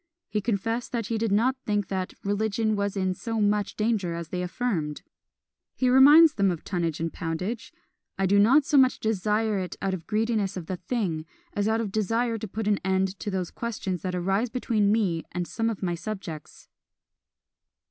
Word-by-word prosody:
He 210 0 -1
confessed 225 +3 -2
that 230 -3 -1
he 225 +1 -2
did 225 -2 0
not 235 +6 +3
think 205 -3 0
that 185 -1 -3
"religion 215 +2 0
was 200 0 -1
in 185 -1 +1
so 225 +4 -3
much 205 -1 +1
danger 210 -6 0
as 170 -1 -6
they 180 - -3
affirmed." 180 -6 -2 0.7
He 255 - +2
reminds 295 +5 +8
them 200 -2 +2
of 170 -3 -3
tonnage 170 -4 -2
and 165 0 -2
poundage; 185 +7 -4 0.5
"I 195 - +1
do 200 +2 +4
not 265 +8 +5
so 285 - +4
much 260 -1 +4
desire 215 0 0
it 185 -1 -4
out 195 -1 -1
of 175 -3 -6
greediness 215 -3 0
of 175 - -5
the 185 +2 -4
thing, 175 -9 -2 0.3
as 205 0 0
out 220 +1 +1
of 220 - -2
a - - -12
desire 225 +3 0
to 220 - -5
put 215 +2 -4
an 205 -1 +2
end 190 0 0
to 210 - -4
those 185 -3 -2
questions 200 -6 -4
that 180 -1 -3
arise 195 +6 0
between 220 -4 +1
me 190 -7 +1
and 175 0 -2
some 225 0 -1
of 215 -3 -5
my 175 -2 0
subjects." 170 -4 -7
205 Hz, 195 wpm, -26 LUFS, 185-225 Hz, 0.7 s, reminds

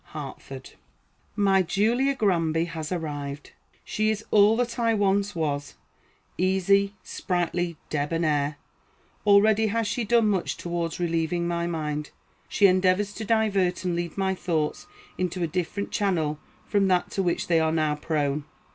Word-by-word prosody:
HARTFORD. - - -8 0.6
My 195 -2 +3
Julia 235 +9 +1
Granby 165 -7 +1
has 160 -2 -6
arrived. 145 -4 -5 0.3
She 215 0 0
is 220 0 -2
all 210 +1 +5
that 245 -1 -2
I 230 -1 +2
once 200 -1 +1
was 145 -3 -2 0.6
easy, 195 +2 +2
sprightly, 175 -2 -2
debonnaire. 150 -1 0 0.7
Already 215 +2 +5
has 225 +2 0
she 240 +3 -1
done 230 0 +3
much 195 -4 0
towards 170 -1 -3
relieving 170 0 0
my 170 0 -1
mind. 150 -3 -3 0.4
She 205 - +3
endeavors 185 +2 +3
to 220 - -6
divert 200 -5 +1
and 175 -1 0
lead 170 0 -4
my 190 -1 +1
thoughts 160 -5 -2 0.3
into 180 -1 -1
a - - +1
different 180 +4 -3
channel 160 -7 0 0.3
from 200 -2 +2
that 180 -1 +1
to 195 - -1
which 175 -2 0
they 170 -2 +3
are 160 0 +2
now 155 -2 +1
prone. 150 -1 -1
180 Hz, 145 wpm, -26 LUFS, 160-200 Hz, 0.7 s, all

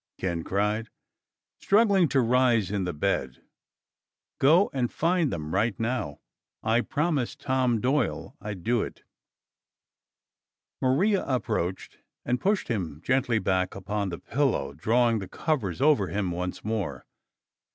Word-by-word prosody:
Ken 85 -3 -2
cried, 105 +4 -1 0.7
struggling 200 -4 +4
to 135 -2 +2
rise 120 -4 +3
in 100 -3 -1
the 90 - -1
bed. 75 -6 -1 1.0
"Go 165 +9 +5
and 125 -3 -1
find 170 -2 +1
them 80 -1 -4
right 105 +1 +1
now. 115 - -2 0.4
I 115 +2 +3
promised 150 -2 -1
Tom 130 -3 +1
Doyle 135 +6 -1
I'd 100 -4 -6
do 120 0 +2
it." - - -7 1.8
Maria 185 +11 +2
approached 110 -8 -2 0.3
and 125 +1 0
pushed 205 +1 +1
him 90 - -3
gently 130 -3 +2
back 95 -2 0
upon 100 +1 -2
the 85 - -5
pillow, 135 - -1
drawing 115 - +2
the 95 - -6
covers 115 - -2
over 140 -10 +4
him 100 -2 -2
once 90 +3 -4
more. 100 - -3
115 Hz, 130 wpm, -27 LUFS, 95-130 Hz, 1.8 s, Go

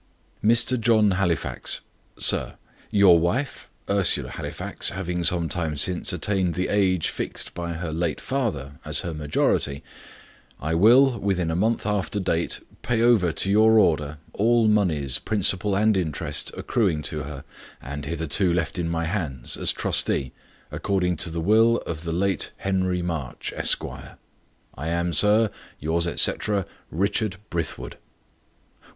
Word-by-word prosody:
"Mr. 115 +3 +3
John 110 -3 +4
Halifax. 90 -5 -1 0.4
"SIR, - - +1 0.3
"Your 95 -4 +6
wife, 120 - -2 0.2
Ursula 100 -2 +2
Halifax, - - -4
having 90 -2 -3
some 85 -1 +2
time 80 -3 -2
since 90 +4 +1
attained 90 0 0
the 90 - -1
age 95 -4 +2
fixed - - -5
by 85 -1 -4
her 85 -1 -5
late 80 -2 -1
father 75 - -3
as - - +1
her 85 - -4
majority, 75 -2 0 0.8
I 80 +3 -2
will, 120 +7 +5
within 90 -4 0
a - - -1
month 110 +6 0
after 105 -1 -1
date, 85 -3 -1 0.2
pay 115 -2 0
over 110 -8 +4
to 95 +4 +1
your 110 +2 +5
order 75 -6 +2 0.2
all 115 +2 +3
moneys, 85 -11 +2
principal 100 -1 0
and 110 +1 +3
interest, 85 -6 -2
accruing 90 -10 0
to 75 -1 -2
her, 70 -2 -7 0.4
and 70 +2 -7
hitherto 85 +3 0
left 85 +1 -1
in 85 -1 -1
my 85 0 -1
hands, 80 -9 -3
as - - 0
trustee, 65 -2 0 0.4
according 90 -3 0
to 85 - -1
the 85 0 -3
will 110 +6 +4
of 80 0 -5
the 85 - -2
late 95 +1 0
Henry 95 -2 -1
March, 80 -8 -4
Esquire. - - 0 0.6
"I 75 +5 -6
am, 85 +1 -1
sir, 105 +6 +4 0.3
"Yours, 85 +3 0
etc., 100 +3 0 0.2
"RICHARD 100 +2 -1
BRITHWOOD." 70 -7 -4
90 Hz, 140 wpm, -24 LUFS, 80-105 Hz, 0.8 s, Your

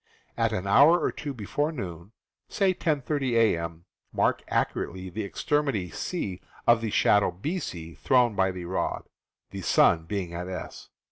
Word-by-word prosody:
At - - +1
an 90 - -2
hour 145 +12 +6
or - - 0
two 145 - -6
before 140 +6 -2
noon 95 - -7 0.4
(say 195 -2 +2
at 185 - -8
10:30 145 -4 0
a.m.) 85 -6 +1 0.3
mark - - +1
accurately 95 +1 -2
the 110 +4 -4
extremity 115 - -1
C 100 - -4 0.2
of 120 -1 +5
the 115 - -2
shadow 105 -1 +3
BC 90 - -5
thrown 125 -4 +3
by 95 -1 +2
the 90 -1 -6
rod, 95 +2 -2 0.5
the - - -6
sun 80 -1 +4
being 90 -2 -4
at 90 +1 -5
S. 95 -1 -7
105 Hz, 155 wpm, -27 LUFS, 90-140 Hz, 0.5 s, hour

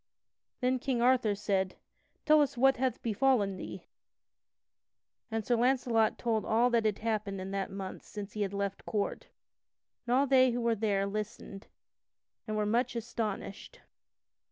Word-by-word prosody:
Then 255 +1 +1
King 255 -1 -1
Arthur 240 -4 +3
said: 195 -2 -1 0.5
"Tell 305 -1 +6
us 280 -4 0
what 270 +2 +4
hath 260 0 -1
befallen 225 -3 +2
thee." - - -8 1.4
And 225 -2 -2
Sir 245 - +2
Launcelot 240 -2 +2
told 225 -3 0
all 235 +3 +2
that 230 -2 +2
had 210 -2 +1
happened 215 -3 -2
in 190 +1 -5
that 195 -1 -2
month 195 -1 -6
since 205 -1 -8
he 210 - -4
had 195 -2 0
left 200 -1 -3
court. 205 -2 -2 0.8
And 245 - +3
all 275 +2 +4
they 260 -1 +5
who 245 0 -1
were 235 0 +2
there 205 -2 0
listened, 205 -1 -6 0.8
and 215 0 -2
were 210 - +1
much 240 +4 +1
astonished. 225 - -5
220 Hz, 155 wpm, -31 LUFS, 200-250 Hz, 1.4 s, Tell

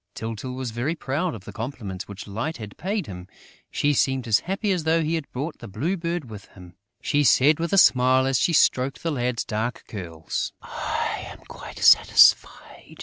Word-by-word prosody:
Tyltyl 115 +3 -5
was 130 -2 -4
very 125 +9 -2
proud 155 +4 -2
of 100 -3 -12
the - - -9
compliments 110 -6 -6
which 100 0 -9
Light 115 +11 -4
had 105 -4 -9
paid 200 +2 -3
him: 90 -2 -9 0.4
she 145 0 +1
seemed 130 -2 0
as 110 - +4
happy 195 +3 -2
as 180 -4 -1
though 160 +1 +2
he 155 +2 -1
had 160 -4 -4
brought 145 +6 -5
the - - -9
Blue 140 - -2
Bird 170 -4 -4
with 105 -3 -10
him: 90 -2 -13 0.3
She 145 0 +1
said, 145 +3 +4
with 170 0 -2
a 195 - +2
smile, 130 -5 +5
as 135 -1 +1
she - - +2
stroked 135 -4 +2
the 165 - -1
lad's 125 -4 -2
dark 110 +3 -3
curls: 85 -6 -5
"I - - -3
am - - -12
quite - - -11
satisfied. - - +4
130 Hz, 195 wpm, -24 LUFS, 110-160 Hz, 0.4 s, smile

